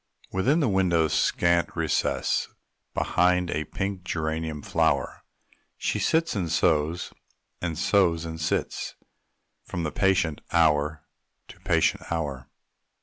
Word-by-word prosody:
Within 135 - +2
the 140 - +2
window's 90 -6 +2
scant 85 0 +2
recess, - - 0 0.5
Behind 90 0 +2
a 75 - -2
pink 95 +4 -4
geranium 80 -3 -3
flower, - - 0 0.6
She - - -1
sits 165 -3 +1
and 90 -5 -2
sews, 80 0 +1 0.5
and 85 -3 -2
sews 85 -3 +2
and 80 0 -6
sits, 80 - -2 0.7
From 90 -2 -4
patient 95 -6 +1
hour 75 -2 +2 0.5
to - - -13
patient - - +1
hour. 70 -6 -3
85 Hz, 110 wpm, -26 LUFS, 80-90 Hz, 0.7 s, Within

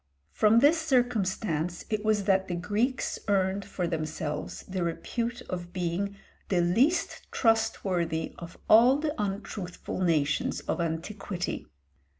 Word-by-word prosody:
From 215 +1 +4
this 305 +4 +5
circumstance 205 - 0
it 215 -1 0
was 215 -2 +2
that 190 -1 +2
the 175 - -2
Greeks 210 +9 -1
earned 195 0 +1
for 185 -2 -3
themselves 155 -2 -3
the 185 -1 -3
repute 235 +8 -3
of 175 -1 -6
being 185 +3 -2 0.3
the 185 - +2
least 230 - +2
trustworthy 180 -8 +1
of 170 0 -9
all 240 +5 +7
the 300 0 -1
untruthful 195 -3 -4
nations 155 -5 +1
of - - -2
antiquity. 175 +3 -3
190 Hz, 125 wpm, -28 LUFS, 175-220 Hz, 0.3 s, all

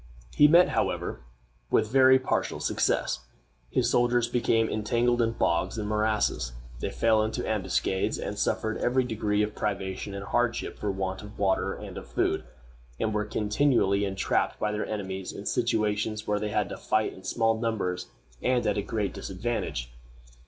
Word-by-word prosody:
He 150 - +8
met, 170 +4 +6
however, - - -1 0.5
with 110 - +2
very 130 0 +7
partial 130 - -1
success. - - 0 0.5
His - - +1
soldiers 120 -1 +3
became 115 -2 +2
entangled 120 +3 +1
in 115 0 +1
bogs 90 0 0
and 105 -1 -2
morasses; 105 - 0 0.3
they - - -2
fell 110 -1 +3
into 110 +1 -2
ambuscades; 95 -2 0
they - - -4
suffered 110 0 -1
every 130 +1 +2
degree 105 -3 0
of 105 0 -2
privation 100 -1 -3
and 100 0 -5
hardship 120 +2 -1
for 105 - -2
want 95 -1 -2
of 105 0 -11
water 95 -1 +1
and - - -7
of - - -13
food, - - 0 0.5
and 110 - 0
were 105 0 0
continually 105 -1 +2
entrapped 95 -2 0
by 105 - 0
their 105 0 -2
enemies 95 -3 -4
in 100 - -8
situations 110 -2 0
where 105 0 0
they 105 0 -2
had 105 -1 0
to - - -6
fight 110 0 0
in 95 - -13
small 115 +3 +1
numbers 100 -6 -2 0.3
and 125 -1 +1
at - - +1
a - - 0
great 105 0 -2
disadvantage. 95 - -3
105 Hz, 165 wpm, -28 LUFS, 100-115 Hz, 0.5 s, He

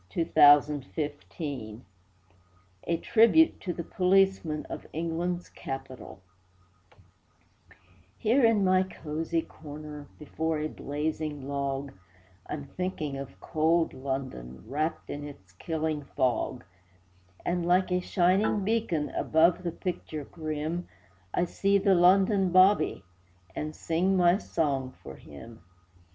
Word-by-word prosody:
THE 165 - -1
LONDON 145 -1 +6
'BOBBY' 145 -6 -5 1.0
A 170 - 0
TRIBUTE 230 - +4
TO 180 - -3
THE 170 - -5
POLICEMEN 185 -4 +2
OF - - -8
ENGLAND'S 170 +2 -2
CAPITAL 135 -6 -8 2.0
Here 245 +5 +2
in 225 -3 +4
my 185 0 +4
cosy 165 -2 -3
corner, 150 -1 -10
Before 160 +1 -2
a 155 +1 -2
blazing 150 -1 -4
log, 140 -1 -3 0.6
I'm 145 -2 -5
thinking 160 -5 -4
of 135 -9 -8
cold 160 - +1
London 130 - -5
Wrapped 155 +6 -3
in 145 - -5
its 95 -10 -13
killing 155 - -3
fog; 125 -1 0 0.8
And, 175 0 0
like 185 +1 +3
a 180 - +2
shining 190 +3 +2
beacon 195 -8 0
Above 165 +3 +2
the 175 -2 -3
picture 160 -4 -5
grim, 155 +3 -4 0.4
I 175 - +1
see 195 +3 +1
the 195 0 +3
London 190 +2 +4
'Bobby,' 185 -1 +4 0.5
And 155 0 -4
sing 180 +4 0
my 175 +2 +4
song 140 -9 -2
for 65 - -9
him. 115 +10 -12
160 Hz, 115 wpm, -28 LUFS, 145-180 Hz, 2.0 s, LONDON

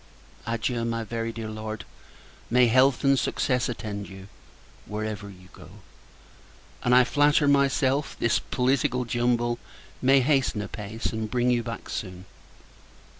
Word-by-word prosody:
Adieu! 115 +1 -1
my 115 0 -2
very 115 +1 -3
dear 115 -1 -6
Lord. 110 0 -6 0.6
May 125 +1 +5
health 130 +2 +4
and 135 -1 +4
success 125 +1 0
attend 105 -3 -5
you, 95 0 -11 0.6
wherever 105 -1 -4
you 90 -1 -15
go! - - -13 1.1
And, 125 0 +4
I 125 - +7
flatter 145 +3 +3
myself, 140 0 +2
this 120 - +2
political 125 -1 0
jumble 120 0 0 0.4
may 135 +1 +5
hasten 130 -6 +1
a - - -6
peace, 110 +2 -5
and 110 -1 -3
bring 125 +1 +1
you 120 -1 +2
back 115 -1 -7
soon. 90 -2 -6
120 Hz, 135 wpm, -26 LUFS, 110-130 Hz, 1.1 s, I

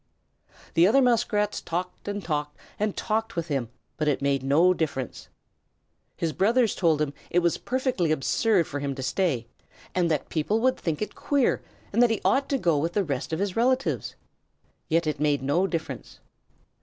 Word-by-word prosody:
The 170 +2 +5
other 235 +7 +5
Muskrats 225 -5 +2
talked 180 +4 -4
and 205 -1 -3
talked 150 -2 -2 0.2
and 210 -1 -1
talked 225 0 -1
with 170 -1 -3
him, 135 -6 -1 0.3
but 155 - -1
it 145 - +2
made 140 -1 +1
no 155 +7 +4
difference. 140 -7 -3 0.9
His 165 -2 -1
brothers 225 +3 +3
told 165 -4 +2
him 150 -2 -1 0.2
it - - -1
was 175 -1 +2
perfectly 255 - 0
absurd 170 - +2
for 145 - -5
him 140 -1 -3
to 130 - -5
stay, 130 -4 0 0.5
that 165 -6 0
people 175 +8 0
would 255 +2 +3
think 165 +2 -2
it - - -6
queer, 280 -3 +1 0.3
and 230 - +3
that 245 - +6
he 225 - 0
ought 270 +1 +2
to 275 - +2
go 170 - +2
with 165 +3 -1
the 205 - +2
rest 140 -3 -3
of 160 - 0
his 195 0 -2
relatives. 255 +3 +1 0.7
Yet 165 +1 +2
it 150 -2 -2
made 145 -2 +1
no 165 +8 +2
difference. 165 -4 -5
170 Hz, 180 wpm, -26 LUFS, 150-215 Hz, 0.9 s, that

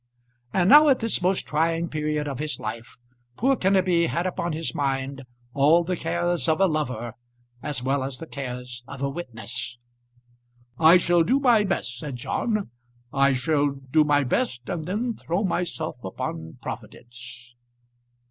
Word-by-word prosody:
And 180 +3 +2
now 295 +6 +9
at 265 - +5
this 225 -4 0
most 185 +1 +1
trying 165 +2 0
period 150 -1 -2
of 135 -3 -4
his 150 0 -2
life, 115 +3 -6 0.4
poor 270 +4 +3
Kenneby 185 -5 +3
had 170 +2 -1
upon 175 -1 -2
his 160 +1 -3
mind 135 -1 -2 0.3
all 150 +5 +5
the 180 +2 -1
cares 175 -4 -1
of 160 - +2
a 195 - +5
lover 130 -9 -2 0.5
as 140 -4 -3
well 135 +1 +1
as 130 -1 -4
the 165 - -7
cares 125 -4 -6
of 140 0 -7
a 140 - +1
witness. 120 -6 -6 1.0
"I 165 +3 +8
shall 175 -1 +3
do 250 +11 +3
my 240 -6 +4
best," 130 -10 -2
said 140 -2 -5
John. 210 - -2 0.4
"I 140 0 +4
shall 145 +3 +1
do 135 +2 +1
my 145 -1 +3
best 125 -1 -1
and 160 -2 -3
then 225 +6 -1
throw 180 -1 -2
myself 175 -9 -2
upon 80 -3 -5
Providence." 120 0 -9
150 Hz, 155 wpm, -25 LUFS, 130-175 Hz, 1.0 s, now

